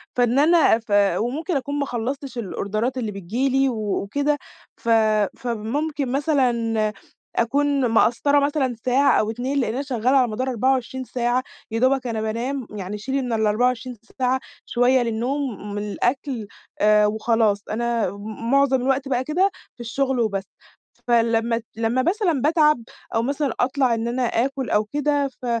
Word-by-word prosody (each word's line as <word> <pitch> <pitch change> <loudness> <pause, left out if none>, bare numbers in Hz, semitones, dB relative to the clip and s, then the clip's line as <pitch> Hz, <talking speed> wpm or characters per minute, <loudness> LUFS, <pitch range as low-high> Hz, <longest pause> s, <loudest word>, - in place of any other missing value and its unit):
فإن 245 +2 +3
أنا 310 -7 +5
ف 225 -2 -13 0.3
وممكن 300 - -2
أكون 285 +2 -3
ما 280 - 0
خلّصتش 255 +2 -4
الأوردرات 215 +4 -2
اللي 225 -4 -2
بتيجي 205 +8 -2
لي 270 +1 +2
وكده، 235 +6 -1 0.4
ف 230 - -5 0.5
فممكن 250 +5 -2
مثلًا 235 -7 +1 0.4
أكون 275 +2 +2
مقصّرة 245 +6 +3
مثلًا 280 -4 0
ساعة 270 +3 +4
أو 215 - 0
2 260 +4 -2
لإن 230 -3 0
أنا 265 - -2
شغالة 255 -3 -1
على 250 -2 +4
مدار 255 +4 -2
24 260 +1 0
ساعة، 245 +1 0 0.3
يا 225 - -1
دوبك 260 0 +2
أنا 220 -2 -2
بانام 235 +4 -3
يعني 205 0 -5
شيلي 265 +6 -2
من 245 -2 -3
ال24 235 +3 0 0.2
ساعة 255 +1 +2 0.3
شوية 250 +1 +3
للنوم 235 -2 -3
وللأكل 230 +3 -2 0.3
آآ، 210 0 +5
وخلاص. 215 -1 +1
أنا 235 -2 0
م 215 +4 -6
معظم 275 -2 +3
الوقت 270 +1 0
بقى 255 -1 0
كده 360 +8 +2 0.3
في - - -43
الشغل 260 +2 -1
وبس، 200 -4 0 0.6
فلمّا 230 0 +2
لمّا 230 +3 +1
مثلًا 350 - +1
باتعب 300 -4 +3 0.3
أو 225 - +2
مثلًا 280 -1 -1
أطلع 255 -1 +2
إن 230 +1 -2
أنا 250 +1 -1
آكُل 265 +3 -1
أو 210 0 +2
كده 290 +2 0
ف 255 -1 -12
250 Hz, 150 wpm, -22 LUFS, 225-275 Hz, 0.6 s, أنا